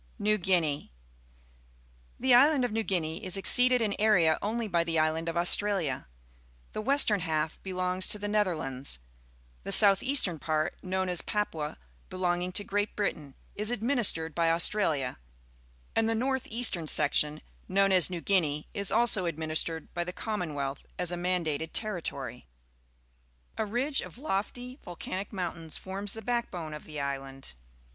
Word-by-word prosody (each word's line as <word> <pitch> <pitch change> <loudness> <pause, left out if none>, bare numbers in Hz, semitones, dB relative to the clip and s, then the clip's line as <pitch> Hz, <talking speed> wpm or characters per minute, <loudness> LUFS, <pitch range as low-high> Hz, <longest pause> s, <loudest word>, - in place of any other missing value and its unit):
NEW 215 +1 +1
GUINEA 170 -6 +1
^^O^ - - -21 1.3
The 260 0 +3
island 270 +1 +5
of 245 - -3
New 225 +1 0
Guinea 175 -2 -2
is 185 0 +2
exceeded 250 +4 +5
in 210 -2 0
area 180 -7 +4
only 225 +2 -2
by 170 -4 +1
the 165 -1 -1
island 160 +1 +1
of 165 - -3
Australia. 175 - +2 0.7
The - - -3
western 230 -4 +3
half 160 -2 -2
belongs 185 0 -2
to - - +1
the 205 0 -4
Netherlands; 160 - -1 0.7
the - - -4
south 195 -2 +6
eastern 255 - +3
part, 155 +2 -1
known 185 0 -2
as 180 -2 0
Papua, 160 -8 -3 0.3
be 185 - -8
longing 180 0 0
to 205 - -1
Great 205 +1 -2
Britain, 155 -9 -3 0.2
is 210 +1 -2
administered 220 - +1
by 165 +1 +1
Australia, 165 - 0 0.8
and 225 0 +2
the 225 - +1
north 265 +3 -1
eastern 220 -8 +2
section, 150 +1 +2 0.3
known 195 +1 +3
as 185 -2 +6
New 175 -2 -5
Guinea, 155 -7 +1
is 200 -1 0
also 220 -3 +3
administered 160 0 -2
by 175 - -1
the 180 - -5
Commonwealth 155 -10 -4
as 180 -1 -1
a - - -2
mandated 170 -3 -1
ter 215 -5 -1
ritory. 135 -5 -5 1.1
A 220 - -2
ridge 260 +6 0
of - - -10
lofty 250 +1 -4
volcanic 185 +2 -6
mountains 170 -5 -4
forms 195 +2 -4
the 225 - -8
backbone 200 -9 -3
of 150 - -9
the 150 -1 -7
island. 135 -1 -5
185 Hz, 155 wpm, -29 LUFS, 160-215 Hz, 1.3 s, south